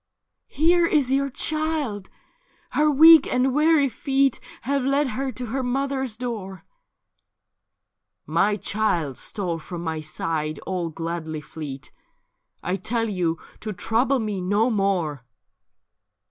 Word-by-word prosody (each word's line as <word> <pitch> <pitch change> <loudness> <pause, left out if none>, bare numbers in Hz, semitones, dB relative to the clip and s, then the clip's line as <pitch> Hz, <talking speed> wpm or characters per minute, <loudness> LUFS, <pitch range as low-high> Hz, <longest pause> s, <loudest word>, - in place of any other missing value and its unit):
' - - -57
Here 340 +3 +3
is 285 -6 +2
your 275 +1 +2
child; 300 -8 -1 0.6
her 300 +1 +3
weak 315 +1 +8
and 255 +1 +2
weary 305 0 +4
feet 270 +2 +1 0.2
Have 275 +2 0
led 275 +1 +1
her 265 +1 -3
to 250 - -5
her 255 +4 -2
mother's 265 -2 -2
door.' 215 -6 -6 0.9
' - - -59 0.6
My 195 +7 +1
child 180 - -1
stole 180 -6 -3
from 175 +1 -7
my 160 -2 -3
side 155 0 -3
all 180 -3 -2
gladly 165 -1 -4
fleet; 140 -1 -8 0.7
I 180 +2 -1
tell 225 +4 -1
yon 175 -5 0 0.2
to 215 -1 -4
trouble 240 +8 +1
me 210 -5 -3
no 205 +6 +2
more.' 180 - 0
220 Hz, 130 wpm, -24 LUFS, 175-275 Hz, 0.9 s, weak